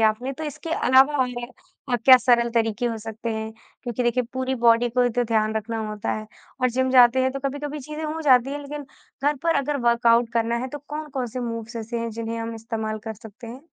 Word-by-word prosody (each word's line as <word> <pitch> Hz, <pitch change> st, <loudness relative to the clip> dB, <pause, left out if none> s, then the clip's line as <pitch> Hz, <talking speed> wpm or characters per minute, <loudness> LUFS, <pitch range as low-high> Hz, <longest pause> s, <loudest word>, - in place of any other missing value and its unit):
आपने, 220 Hz, +4 st, +1 dB
तो 315 Hz, +4 st, -6 dB
इसके 305 Hz, +2 st, -6 dB
अलावा 270 Hz, -1 st, +4 dB
और 255 Hz, -2 st, +2 dB, 0.6 s
अ, -, -, +4 dB
क्या 260 Hz, -1 st, +10 dB
सरल 240 Hz, -1 st, +3 dB
तरीके 225 Hz, +1 st, +1 dB
हो 230 Hz, -1 st, -2 dB
सकते 225 Hz, +1 st, -5 dB
हैं 220 Hz, 0 st, -4 dB, 0.3 s
क्योंकि 245 Hz, -1 st, -3 dB
देखिए 240 Hz, +1 st, +1 dB
पूरी 260 Hz, 0 st, -1 dB
बॉडी 235 Hz, 0 st, +4 dB
को 250 Hz, +2 st, +1 dB
भी 245 Hz, -, +3 dB
तो 245 Hz, +1 st, 0 dB
ध्यान 220 Hz, -1 st, +1 dB
रखना 225 Hz, +1 st, -3 dB
होता 210 Hz, -1 st, -3 dB
है 215 Hz, 0 st, -5 dB, 0.4 s
और 255 Hz, -, +3 dB
जिम 260 Hz, +2 st, 0 dB
जाते 250 Hz, 0 st, +6 dB
हैं, 260 Hz, -, +2 dB
तो 275 Hz, -, -4 dB
कभी-कभी 290 Hz, +2 st, -5 dB
चीज़ें 305 Hz, +3 st, -6 dB
हो 310 Hz, +1 st, -3 dB
जाती 260 Hz, -2 st, +4 dB
हैं, 290 Hz, -, -3 dB
लेकिन 290 Hz, 0 st, -7 dB, 0.4 s
घर 290 Hz, +1 st, +2 dB
पर 330 Hz, -1 st, +2 dB
अगर 285 Hz, +1 st, 0 dB
वर्कआउट 235 Hz, 0 st, +4 dB
करना 235 Hz, 0 st, +1 dB
है, 255 Hz, +2 st, -3 dB
तो 290 Hz, -, -7 dB
कौन-कौन 295 Hz, -4 st, -4 dB
से 250 Hz, +2 st, -5 dB
मूव्स 230 Hz, 0 st, -5 dB
ऐसे 230 Hz, +1 st, -4 dB
हैं, 230 Hz, 0 st, -3 dB
जिन्हें 230 Hz, +1 st, -4 dB
हम 230 Hz, 0 st, -4 dB
इस्तेमाल 220 Hz, -1 st, -4 dB
कर 220 Hz, -, -4 dB
सकते 220 Hz, +3 st, -13 dB
हैं? 245 Hz, +4 st, -9 dB
240 Hz, 225 wpm, -24 LUFS, 230-265 Hz, 0.6 s, क्या